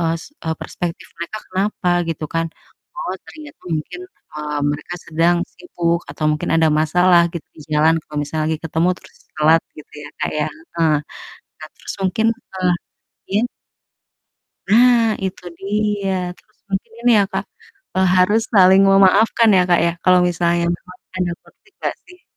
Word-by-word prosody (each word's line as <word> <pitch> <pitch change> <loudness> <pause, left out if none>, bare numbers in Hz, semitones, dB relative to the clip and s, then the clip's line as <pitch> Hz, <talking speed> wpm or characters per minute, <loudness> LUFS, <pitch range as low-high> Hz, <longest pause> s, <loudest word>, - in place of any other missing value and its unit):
es 165 - -8 0.2
eee, 160 0 -1
prespektif 175 0 -5
mereka 170 +5 -5
kenapa, 190 -1 -1 0.2
gitu 155 -1 -3
kan. 165 0 +1 0.5
Oh - - -3 0.2
ternyata 305 -1 -12
mungkin, 155 - -4 0.3
eee, 150 -1 -3
mereka 160 +4 -6
sedang 165 +2 +2 0.2
sibuk 170 - -2
atau 155 - -3
mungkin 150 - -2
ada 160 -1 +4
masalah 175 +3 +4
gitu, 170 - -6
di 155 - -12
jalan, 155 +2 +4
kalau 150 - -7
misalnya 155 +1 -3
lagi 160 - 0
ketemu, 165 +3 +1
terus - - -18 0.2
telat 160 +2 +5 0.2
gitu 150 - -13
ya, - - -8
Kak, - - -1
ya. 150 - +1 0.3
Heeh, 160 -2 +3 0.6
nah 155 - -8
terus - - -8
mungkin, 220 +4 +1
eee, 185 -6 -2 0.6
iya? 205 +4 +2 1.3
Ah, 240 +1 +6 0.2
itu 185 -1 -4 0.2
dia, 205 0 -1 0.3
terus 215 - -28
mungkin 195 +4 -2
ini 245 - +4
ya, 200 - +4
Kak, - - -2 0.5
eee, 190 - +4
harus 205 +5 +4
saling 190 -1 +7
memaafkan 205 +4 +5
ya, 180 - +5
Kak, 175 - +5
ya, 170 - +1
kalau 180 0 +6
misalnya 170 0 +1
memang 180 +1 -7 0.2
ada 175 -1 0
konflik 420 - -25
nggak - - -1
sih? 360 -1 -17
180 Hz, 160 wpm, -19 LUFS, 160-205 Hz, 1.3 s, saling